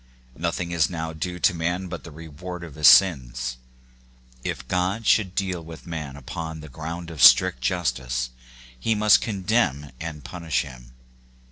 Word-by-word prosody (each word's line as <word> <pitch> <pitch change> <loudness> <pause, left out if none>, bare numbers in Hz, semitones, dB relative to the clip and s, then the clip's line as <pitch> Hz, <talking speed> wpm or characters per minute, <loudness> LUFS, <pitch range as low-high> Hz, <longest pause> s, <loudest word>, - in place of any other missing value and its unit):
Nothing 85 +2 -2
is 80 -3 +2
now 80 -2 -4
due 90 +3 -4
to 90 - +3
man 85 +3 -2
but 85 -2 -7
the - - -9
reward 80 +3 -8
of 80 -4 -9
his 75 -1 +4
sins. 65 -9 +4 0.9
If 65 -1 -4
God 95 - -1
should 105 -2 +4
now 90 - -17
deal 95 -4 -2
with 80 0 -11
man 75 -5 -5
upon 80 +3 -6
the 80 - -10
ground 85 +4 -6
of 80 -5 -6
strict 65 - +7
justice, 65 -5 -1 0.5
he 110 - +1
must 105 0 +5
condemn 95 - 0
and 80 -3 -6
pun 85 +8 -8
ish 70 -6 +1
him. - - -12
80 Hz, 165 wpm, -24 LUFS, 70-90 Hz, 0.9 s, strict